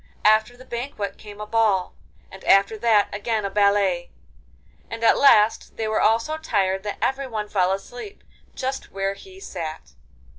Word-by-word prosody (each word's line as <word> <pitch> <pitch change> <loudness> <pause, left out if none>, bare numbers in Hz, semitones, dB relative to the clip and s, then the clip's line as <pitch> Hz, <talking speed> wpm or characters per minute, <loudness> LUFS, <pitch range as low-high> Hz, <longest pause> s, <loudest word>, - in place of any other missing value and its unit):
After 220 +3 +4
the 255 - -14
banquet 235 -4 -5
came 210 -1 -11
a 210 - -5
ball, 210 -4 +1 0.4
and 190 - -12
after 195 +3 +4
that 215 -2 +3
again 215 +1 -2
a 200 - -3
ballet, 200 -3 +2 0.8
and 230 0 -6
at 230 - +6
last 225 -6 +4
they 225 - -2
were 215 - 0
all 225 +1 +5
so 310 +7 -4
tired 195 -10 0
that 205 +1 -5
everyone 260 -6 -2
fell 185 -3 +1
asleep 245 - -7 0.3
just 265 +1 -4
where 195 0 -2
he 380 - -14
sat. 165 - -7
215 Hz, 160 wpm, -23 LUFS, 195-235 Hz, 0.8 s, at